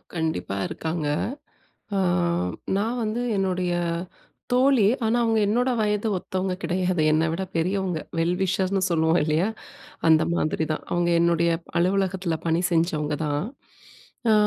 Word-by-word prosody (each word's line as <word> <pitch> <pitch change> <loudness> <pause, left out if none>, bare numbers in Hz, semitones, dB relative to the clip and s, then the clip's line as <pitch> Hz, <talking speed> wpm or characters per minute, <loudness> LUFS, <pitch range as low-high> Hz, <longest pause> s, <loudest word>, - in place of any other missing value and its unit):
கண்டிப்பா 160 - -2
இருக்காங்க. 160 -2 -3 0.9
அ - - +1 0.8
நான் 230 +4 -1
வந்து 220 +3 -2 0.2
என்னுடைய 185 -2 0 0.8
தோழி. 255 -4 +4 0.2
ஆனா, 230 +2 +2
அவங்க 225 -1 +2
என்னோட 245 +5 +2
வயது 210 +1 0
ஒத்தவங்க 185 +1 -2
கிடையாது. 180 -2 0
என்னை 160 +1 +2
விட 190 - -2
பெரியவங்க 180 0 0 0.2
வெல் 170 +2 +1
விஷர்ஸ்ன்னு 190 0 +1
சொல்லுவோம், 160 +1 +3
இல்லயா? 155 +5 +1 0.6
அந்த 160 -1 +6
மாதிரி 155 -1 0
தான். 155 - -4
அவங்க 175 0 +1
என்னுடைய 170 0 +3 0.3
அலுவலகத்துல 190 -1 +1
பணி 165 +1 +2
செஞ்சவங்க 155 -3 +1
தான். 145 +2 -1 0.9
அ - - +6
180 Hz, 125 wpm, -24 LUFS, 160-195 Hz, 0.9 s, அந்த